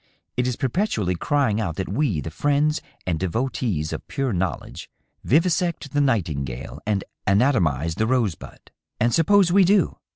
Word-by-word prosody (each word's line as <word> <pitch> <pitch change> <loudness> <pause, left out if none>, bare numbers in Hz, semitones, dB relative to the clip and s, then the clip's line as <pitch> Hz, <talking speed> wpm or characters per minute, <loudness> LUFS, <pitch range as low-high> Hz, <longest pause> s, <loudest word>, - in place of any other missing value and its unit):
It 125 0 0
is 125 - -1
perpetually 125 - 0
crying 115 +2 +1
out 85 -7 -2
that 95 - -3
we, 105 - 0
the 80 - -6
friends 145 - +1 0.2
and 85 -3 -1
devotees 95 - -1
of - - -7
pure 135 -4 -2
knowledge, 90 -6 -3 0.3
vivisect 165 0 +1
the 145 - +2
nightingale 75 - -2
and 100 -3 0 0.2
anatomize 90 - +2
the 110 +6 0
rosebud. 115 - -2 0.3
And 120 +1 +2
suppose 185 +2 +4
we 195 +2 +6
do 200 +3 +2
115 Hz, 150 wpm, -23 LUFS, 90-145 Hz, 0.3 s, we